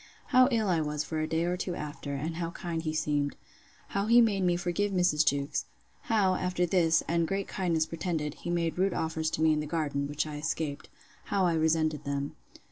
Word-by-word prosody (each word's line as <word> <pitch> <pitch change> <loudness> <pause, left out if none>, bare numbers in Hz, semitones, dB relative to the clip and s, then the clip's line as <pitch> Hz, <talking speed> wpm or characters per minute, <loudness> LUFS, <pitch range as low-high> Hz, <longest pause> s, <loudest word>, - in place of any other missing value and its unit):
How 255 0 +6
ill 225 -5 +1
I 170 -4 +2
was 150 -1 -2
for 155 +1 -3
a 155 - -1
day 160 +1 0
or 175 +1 0
two 180 -1 -3
after; 145 -1 -5
and 160 +4 -3
how 170 -1 -2
kind 170 -1 -4
he 155 -1 -2
seemed. 145 -2 0 0.5
How 200 +1 -1
he 235 +2 +7
made 215 -5 +3
me 175 -1 +3
forgive 180 +3 -1
Mrs. 180 -5 +3
Jewkes. 140 -1 0 0.4
How, 205 -5 +3
after 180 -1 0
this, 165 -2 +3
and 170 0 +1
great 195 +2 -2
kindness 170 -4 0
pretended, 160 -3 -3
he 175 - -7
made 170 0 -1
rude 190 0 +2
offers 160 0 -1
to 155 - -1
me 160 -1 +5
in 150 - 0
the 150 - -3
garden, 145 -3 -1
which 145 +1 -1
I 150 -1 -6
escaped. 150 -1 -3 0.4
How 195 -2 +1
I 175 - +2
resented 160 -1 +1
them. 140 0 -3
165 Hz, 210 wpm, -29 LUFS, 150-180 Hz, 0.5 s, he